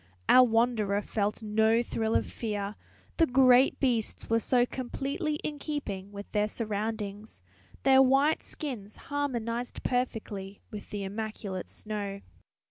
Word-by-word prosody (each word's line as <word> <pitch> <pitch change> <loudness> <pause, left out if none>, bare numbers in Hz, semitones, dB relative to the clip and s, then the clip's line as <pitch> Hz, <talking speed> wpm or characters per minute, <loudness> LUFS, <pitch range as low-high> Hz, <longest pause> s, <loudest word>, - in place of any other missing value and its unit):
Our 255 - +8
wanderer 225 -4 +2
felt 210 +1 -2
no 220 +2 +3
thrill 225 -1 -1
of - - +2
fear, 205 -3 -3 0.4
the 330 - +5
great 255 0 +5
beasts 240 -5 0
were 230 - +4
so 245 +1 +3
completely 275 +5 -3
in 295 -1 -4
keeping 205 -11 -4
with 200 0 -9
their 210 0 +2
surroundings; 210 - -4 0.4
their 265 0 +7
white 270 +4 +4
skins 225 -9 -6
harmonized 245 -4 -3
perfectly 215 -6 -2
with 210 -2 -8
the 205 -1 -4
immaculate 200 -2 -5
snow. 205 -2 -5
225 Hz, 130 wpm, -29 LUFS, 205-255 Hz, 0.4 s, Our